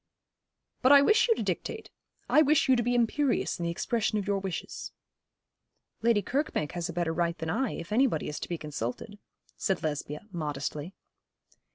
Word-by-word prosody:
'But 255 - +5
I 280 -1 +9
wish 435 +9 +4
you 455 - +4
to - - -3
dictate. - - -4 0.4
I 305 - +5
wish 305 0 +4
you 260 - +5
to 240 - +2
be 245 +1 0
imperious 245 -1 +1
in 170 - -2
the - - 0
expression 215 +5 0
of 205 - -2
your 200 -1 0
wishes.' 190 -3 -5 1.1
'Lady 230 -3 +3
Kirkbank 265 - -1
has 175 -1 -3
a - - -5
better 170 -1 -1
right 170 0 0
than 160 -1 -3
I, 245 +4 0
if 170 - -7
anybody 230 - +2
is 150 - -4
to - - -6
be 170 - -2
consulted,' 150 - -5 0.4
said 190 -2 -1
Lesbia, 150 -1 -3
modestly. 150 +1 -4
195 Hz, 180 wpm, -29 LUFS, 160-245 Hz, 1.1 s, I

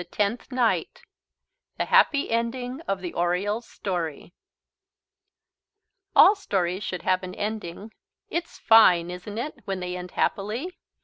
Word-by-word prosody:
TENTH 210 +6 -2
NIGHT 250 -3 0 0.7
THE - - 0
HAPPY 285 -5 +3
ENDING 245 +4 -2
OF 195 -1 -1
THE 175 -2 -5
ORIOLE'S 195 +6 -1
STORY 175 -3 -4 1.8
All 400 - +9
stories 190 - -2
should 180 - -4
have 185 -1 +2
an 185 -1 -7
ending. 210 -1 -5 0.4
It's 340 0 -4
fine, 180 -6 +5
isn't 180 +4 -7
it, 260 +3 -4
when 195 -2 -3
they 180 0 -4
end 180 0 -6
happily? 225 - -2
200 Hz, 125 wpm, -25 LUFS, 180-235 Hz, 1.8 s, All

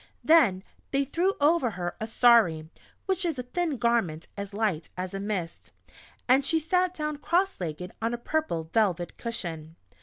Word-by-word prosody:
Then 245 - +5 0.3
they 275 0 +1
threw 350 +8 0
over 290 -3 +3
her 175 -4 -4
a 220 - -2
"sari" 225 -10 +4 0.4
(which 380 -1 0
is 330 -5 -1
a 250 - -3
thin 315 +3 -2
garment, 225 -10 0
as 200 0 -6
light 200 -6 -1
as 185 +1 -4
a 195 - -3
mist), 195 -5 -4 0.6
and 260 +2 +5
she 320 +3 +1
sat 360 +3 +1
down 300 -2 -3
cross 360 - 0
legged 175 +2 -5
on 230 +1 0
a 240 - -2
purple 240 - -2
velvet 185 -6 +1
cushion. 165 -9 -5
235 Hz, 170 wpm, -27 LUFS, -, 0.6 s, Then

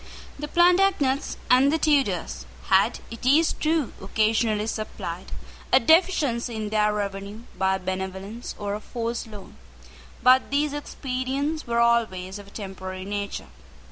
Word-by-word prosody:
The 295 - -4
Plantagenets 350 -5 +3
and 260 +3 +5
the 320 - +2
Tudors 275 - 0 0.2
had, - - +3
it 230 - -9
is 295 +6 +4
true, 310 -4 0
occasionally 215 +1 +1
supplied 200 -5 -5 0.4
a - - +7
deficiency 275 -6 +2
in 215 -1 -3
their 210 0 +2
revenue 200 +1 -4
by 190 0 +1
a - - -4
benevolence 190 +4 -5
or 205 -1 -3
a 210 - -3
forced 235 0 -4
loan: 210 -3 -11 0.7
but 255 +1 +5
these 285 +1 +1
expedients 280 +1 -3
were 235 0 +1
always 210 -5 +1
of 200 - -12
a - - -13
temporary 190 -2 -7
nature. 200 0 -4
230 Hz, 140 wpm, -25 LUFS, 200-275 Hz, 0.7 s, a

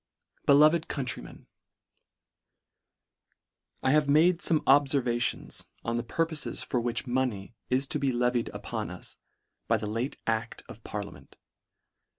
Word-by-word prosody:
Beloved 155 +3 +6
Countrymen, 135 -2 -5 2.4
IH 130 - +3
A 150 - +6
V 145 - -8
E - - +2
made 165 +4 +5
fome 160 -4 +2
obfervations 135 -3 +2 0.2
on 115 - -1
the 120 - 0
purpofes 160 +5 -2
for 125 - 0
which 120 +1 -1
money 120 -5 -1 0.2
is 130 +2 +1
to - - -2
be 135 -1 +1
levied 125 -1 +1
upon - - -5
us - - -9 0.5
by 115 - +3
the 110 - -5
late 115 +6 -3
ad: 115 +1 -2
of 110 - -12
parliament. 100 -9 -7
125 Hz, 135 wpm, -28 LUFS, 115-145 Hz, 2.4 s, Beloved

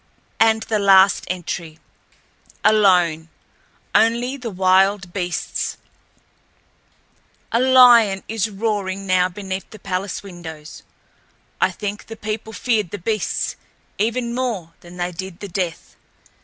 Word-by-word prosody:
And 220 0 +4
the 215 -2 -1
last 195 -1 +5
entry: 175 -3 -5 0.4
"... - - -31
alone. 180 -6 +3 0.6
Only 235 +4 +2
the 250 -4 -6
wild 190 0 +2
beasts... 180 -3 -3 1.7
A 230 - +2
lion 245 -6 +6
is 220 -1 -1
roaring 195 -2 -2
now 185 -1 +2
beneath 190 0 -6
the 215 - -12
palace 195 0 -4
windows. 160 -5 -10 0.8
I - - +4
think 205 -1 -6
the 225 - -9
people 215 +1 -5
feared 220 -5 0
the 205 - -5
beasts 215 +3 -2 0.4
even 235 +2 -1
more 225 -10 -3
than 175 +1 -13
they 175 0 -2
did 185 +1 -7
the 205 - -6
Death. 180 -3 -4
195 Hz, 120 wpm, -21 LUFS, 180-220 Hz, 1.7 s, lion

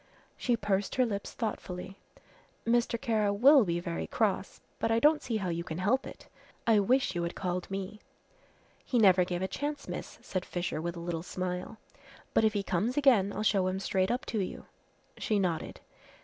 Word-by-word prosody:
She 240 -2 0
pursed 200 -1 -1
her 255 - +4
lips 200 -3 -4
thoughtfully. 195 -4 -5 0.7
"Mr. 235 0 +2
Kara 220 -5 +1
will 260 +6 +7
be 170 -3 -1
very 80 - -4
cross, - - -1 0.2
but - - 0
I 225 - +3
don't 300 +5 +4
see 230 -3 -2
how 190 -4 -2
you 170 0 -2
can 160 -1 -5
help 210 +9 +1
it. - - -11 0.4
I 225 -2 +5
wish 245 +1 +2
you 175 - -2
had 170 0 -3
called 180 -1 -3
me." 195 +2 -5 0.8
"He 250 - -1
never 190 -5 +6
gave 180 0 -3
a - - 0
chance, 290 +6 -4
miss," - - -6
said 185 -1 -3
Fisher, 175 -4 -3
with 170 +1 -3
a - - -6
little 170 -1 -3
smile, 180 +4 -4 0.6
"but - - +4
if 215 -1 +3
he 205 -2 -1
comes 200 +8 -1
again 240 -9 +4
I'll 210 - -3
show 195 -3 +3
him 185 +1 -1
straight 190 0 0
up 245 +2 -1
to 220 - -2
you." 190 - -4 0.5
She 215 - +1
nodded. 180 -5 -1
195 Hz, 190 wpm, -30 LUFS, 180-230 Hz, 0.8 s, will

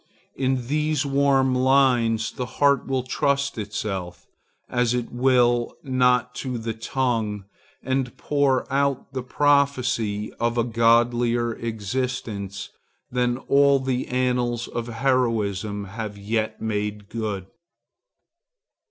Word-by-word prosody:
In 130 -2 0
these 150 +1 0
warm 135 -1 +3
lines 125 -4 +3
the 125 - -5
heart 140 -2 +3
will 130 -2 0
trust 140 0 0
itself, 95 -4 -4 0.4
as 125 -1 +1
it 120 -1 -3
will 120 -1 +2
not 125 -2 +2
to 130 -3 -3
the 115 0 -3
tongue, 110 -4 -2 0.4
and 130 -1 -1
pour 140 -3 +1
out 140 -1 0
the 130 - -2
prophecy 125 -6 +1
of 120 +1 0
a 120 - +3
godlier 120 0 +2
existence 110 -3 -4 0.4
than 125 -1 +1
all 140 +1 +4
the 130 -1 -2
annals 125 -2 0
of 120 0 -4
heroism 110 -5 0
have 105 +1 -6
yet 110 +2 -2
made 105 -1 -3
good. 105 -4 -4
120 Hz, 110 wpm, -24 LUFS, 110-130 Hz, 0.4 s, all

